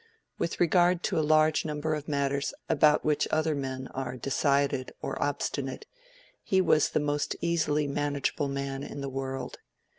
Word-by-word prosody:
With 170 - -2
regard 175 +1 +3
to - - 0
a - - +3
large 155 0 +4
number 155 0 -2
of 150 -1 -4
matters 140 -1 -1
about 150 -1 +4
which 150 -1 +2
other 155 0 +1
men 130 -2 -4
are 130 -1 -5
decided 140 0 0
or - - -4
obstinate, 140 -2 -2 0.6
he 190 - +1
was 155 -5 +4
the - - +1
most 145 0 -1
easily 155 -3 +1
manageable 145 +1 -1
man 140 0 -3
in 140 - -6
the 140 - -3
world. 135 0 -5
145 Hz, 155 wpm, -28 LUFS, 140-155 Hz, 0.6 s, large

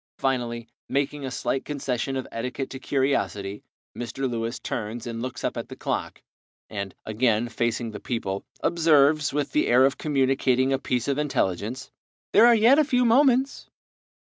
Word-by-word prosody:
Finally, 120 -3 -1 0.2
making 140 +1 -1
a 135 - -3
slight 135 +1 -2
concession 135 -2 -3
of 130 - -4
etiquette 125 +4 -4
to 130 - -6
curiosity, 130 -8 -1 0.3
Mr. 120 +3 -3
Lewis 115 0 -3
turns 110 +2 -5
and 115 -1 -5
looks 130 0 -5
up - - -1
at - - -5
the - - -8
clock, - - -4 0.5
and, 100 -2 -5
again 110 +1 +1
facing 120 -1 -2
the 105 - -7
people, 100 -5 -3 0.2
observes, 155 -3 +4
with 145 0 -2
the 150 - +2
air 125 +2 +5
of 135 - 0
communicating 135 -2 +2
a 135 - +1
piece 125 -2 -1
of 140 0 0
intelligence, 125 -2 -2 0.4
"There 225 +3 +7
are 240 - +7
yet 235 +6 +5
a - - +6
few 250 -3 +2
moments." 260 +2 +3
130 Hz, 165 wpm, -25 LUFS, 115-145 Hz, 0.5 s, There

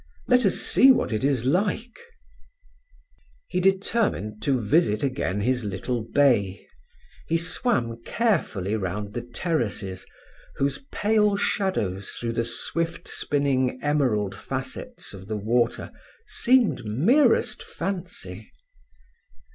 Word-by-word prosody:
Let 250 -3 +4
us - - +2
see 270 - +6
what 255 - +1
it 110 - -1
is 135 -4 +1
like." 205 - 0 1.5
He - - -1
determined 190 - 0
to 130 +2 +1
visit 110 -1 +2
again 125 -7 -1
his 125 +2 +1
little 105 +5 -3
bay. 110 -6 +2 0.6
He 165 - +2
swam 165 - -1
carefully 115 - 0
round 100 +1 -3
the 120 - -3
terraces, 115 - -3 0.5
whose 140 0 0
pale 210 -1 +2
shadows 105 - -1
through 115 -1 -2
the 115 0 0
swift 165 +8 -2
spinning 135 -3 0
emerald 125 -10 +1
facets - - -6
of 95 -1 -10
the 110 0 -2
water 115 +3 0 0.3
seemed 250 -2 +2
merest 225 - +3
fancy. 180 0 -6
130 Hz, 110 wpm, -25 LUFS, -, 1.5 s, see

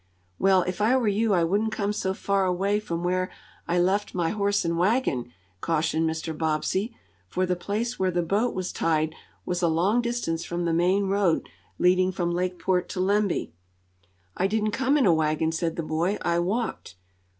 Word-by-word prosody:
"Well, 190 -2 +4
if 185 +3 -4
I 235 +5 +4
were 240 -4 0
you 210 0 +2
I 175 - +3
wouldn't 205 +6 +1
come 205 -1 -1
so 190 -2 -2
far 195 -1 +1
away 195 +3 +1
from 170 -5 -4
where 185 +1 0 0.4
I 175 - +1
left 190 +4 +1
my 170 -2 +1
horse 205 -2 0
and 170 0 0
wagon," 175 - +1 0.3
cautioned 160 - 0
Mr. 160 0 -4
Bobbsey, 165 +8 -1 0.3
for 185 - 0
the 180 0 0
place 215 +7 -3
where 190 -1 +2
the 175 -1 0
boat 205 +8 0
was 185 -1 -3
tied 160 -1 0 0.3
was 180 0 -2
a 170 - +3
long 185 +9 +2
distance 235 -9 -2
from 175 0 -3
the 165 - +1
main 185 +4 +2
road 195 -4 +1 0.3
leading 185 +1 +3
from 175 -2 -1
Lakeport 180 0 -1
to 185 - -5
Lemby. 200 - +1 0.8
"I 190 - +1
didn't 215 +1 0
come 265 +5 +2
in 275 - +3
a 175 - +5
wagon," 160 0 +1
said 165 0 -2
the 165 - -3
boy. 165 +6 0
"I 170 0 +1
walked." 195 - -2
185 Hz, 185 wpm, -26 LUFS, 170-205 Hz, 0.8 s, a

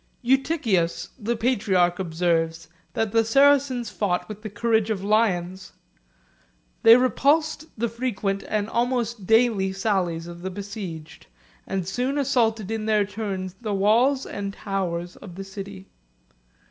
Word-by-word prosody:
Eutychius 250 - +1
the 235 +2 -1
patriarch 195 -7 +1
observes, 165 -2 0 0.3
that 225 -2 -1
the 225 +1 +3
Saracens 265 -1 +3
fought 185 -4 -1
with 215 -1 -8
the 215 - -6
courage 220 +1 +1
of 200 -3 -2
lions: 190 -4 0 1.1
they 225 +1 +9
repulsed 295 +6 +1
the 235 +2 0
frequent 215 -4 -2
and 210 -1 -1
almost 235 -3 -1
daily 225 -4 +3
sallies 190 -4 -1
of 170 0 -9
the 190 - -4
besieged, 190 - -8 0.4
and 190 -2 -2
soon 250 +8 -1
assaulted 225 -6 +1
in 220 -1 -3
their 210 -2 +3
turn 195 -3 -4
the 215 -3 -2
walls 240 +8 +3
and 200 -1 -5
towers 180 -4 -3
of 180 -4 -11
the 195 - -6
city. 195 0 -9
210 Hz, 135 wpm, -24 LUFS, 190-235 Hz, 1.1 s, they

